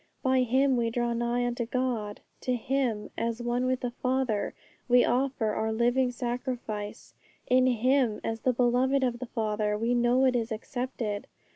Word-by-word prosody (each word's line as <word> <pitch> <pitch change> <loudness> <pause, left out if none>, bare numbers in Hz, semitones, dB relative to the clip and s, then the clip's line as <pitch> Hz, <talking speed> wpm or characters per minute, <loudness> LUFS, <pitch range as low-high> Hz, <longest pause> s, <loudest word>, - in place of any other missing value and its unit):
By 260 -1 +3
Him 260 +2 +3
we 230 -1 +1
draw 240 0 -1
nigh 240 +1 0
unto 240 -1 -2
God; 235 -5 -2 0.2
to 255 - -1
Him, 245 -3 -1
as 230 0 -1
one 240 +1 0
with 255 0 0
the 245 - -2
Father, 255 -4 -1 0.3
we 245 0 +6
offer 250 -4 0
our 220 +1 -1
living 245 +3 +2
sacrifice; 240 -4 -4 0.3
in 255 0 +4
Him, 250 -2 +2
as 225 0 -2
the 255 - +2
Beloved 250 +3 +2
of 240 -2 0
the 255 - -5
Father, 210 -2 -1
we 230 +3 0
know 245 +2 +3
it 255 -1 +3
is 230 -1 -1
accepted. 225 -2 -4
245 Hz, 165 wpm, -28 LUFS, 225-255 Hz, 0.3 s, we